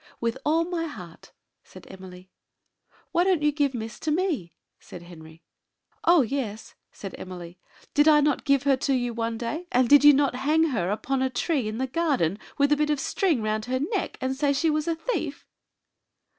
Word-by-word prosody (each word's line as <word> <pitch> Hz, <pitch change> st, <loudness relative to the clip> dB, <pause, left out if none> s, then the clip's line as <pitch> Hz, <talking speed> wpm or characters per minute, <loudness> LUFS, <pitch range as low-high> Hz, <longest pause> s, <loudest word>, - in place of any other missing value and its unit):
"With 230 Hz, -1 st, -1 dB
all 325 Hz, +2 st, +2 dB
my 340 Hz, -1 st, -3 dB
heart," 180 Hz, -, -11 dB, 0.3 s
said -, -, -15 dB
Emily. 185 Hz, 0 st, -12 dB, 0.8 s
"Why 345 Hz, 0 st, +2 dB
don't 365 Hz, -5 st, +1 dB
you 300 Hz, -, +3 dB
give 285 Hz, -3 st, 0 dB
Miss 225 Hz, -1 st, -6 dB
to 315 Hz, -, -3 dB
me?" 305 Hz, -, -1 dB, 0.2 s
said 175 Hz, -, -11 dB
Henry. 160 Hz, -1 st, -14 dB, 0.6 s
"Oh, 340 Hz, -4 st, +6 dB
yes!" 225 Hz, -4 st, -4 dB, 0.2 s
said 195 Hz, -, -9 dB
Emily. 180 Hz, -1 st, -9 dB, 0.3 s
"Did 295 Hz, +1 st, +4 dB
I 300 Hz, -1 st, +7 dB
not 295 Hz, -2 st, +1 dB
give 275 Hz, -1 st, +2 dB
her 280 Hz, -1 st, +3 dB
to 275 Hz, 0 st, 0 dB
you 245 Hz, -2 st, -1 dB
one 230 Hz, 0 st, -3 dB
day; 295 Hz, +10 st, -4 dB
and 250 Hz, 0 st, +3 dB
did 290 Hz, +3 st, +6 dB
you 295 Hz, 0 st, +9 dB
not 275 Hz, -3 st, +1 dB
hang 305 Hz, +5 st, +2 dB
her 195 Hz, -9 st, -1 dB
upon 260 Hz, +6 st, -1 dB
a 260 Hz, -, +1 dB
tree 265 Hz, -1 st, -1 dB
in 215 Hz, +1 st, -4 dB
the 260 Hz, -, -1 dB
garden, 260 Hz, -, 0 dB, 0.2 s
with 285 Hz, +1 st, +2 dB
a 295 Hz, -, +4 dB
bit 300 Hz, 0 st, 0 dB
of 295 Hz, -2 st, 0 dB
string 320 Hz, -, 0 dB
round 215 Hz, 0 st, -1 dB
her 255 Hz, +1 st, -1 dB
neck, 365 Hz, -, -3 dB
and 260 Hz, +1 st, -1 dB
say 285 Hz, +1 st, +1 dB
she 315 Hz, +3 st, +1 dB
was 305 Hz, +1 st, -1 dB
a 335 Hz, -, 0 dB
thief?" -, -, -4 dB
270 Hz, 200 wpm, -25 LUFS, 220-300 Hz, 0.8 s, you